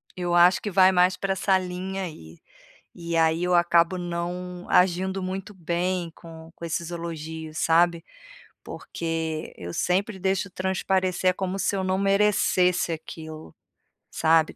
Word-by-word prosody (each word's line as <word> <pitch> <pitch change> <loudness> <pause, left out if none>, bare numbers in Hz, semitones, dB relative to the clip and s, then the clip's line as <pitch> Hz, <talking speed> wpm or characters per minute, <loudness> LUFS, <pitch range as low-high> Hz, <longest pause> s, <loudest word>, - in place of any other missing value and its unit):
Eu 175 -1 -2
acho 175 +1 +5
que 210 - -3
vai 190 0 +6
mais 180 0 +3
pra 195 0 -1
essa 190 0 +2
linha 185 +1 -4
aí, 85 - -9 0.6
e 170 -1 -4
aí 160 +1 +2
eu 180 0 +1
acabo 170 +1 +3
não 175 +1 -5
agindo 185 +1 +2
muito 190 +2 -5
bem 175 0 -2
com 165 -1 -12
com 170 - -10
esses 170 +1 -3
elogios, 160 -2 -6
sabe? 170 0 +3 0.6
Porque 160 -1 -4
eu 85 0 -7
sempre 190 +3 0
deixo 190 +1 0
transparecer, 185 0 0
como 190 0 -3
se 200 - 0
eu 190 - -1
não 185 0 0
merecesse 195 -3 +2
aquilo, 160 -1 -8 0.6
sabe 160 0 +2
180 Hz, 140 wpm, -25 LUFS, 165-190 Hz, 0.6 s, vai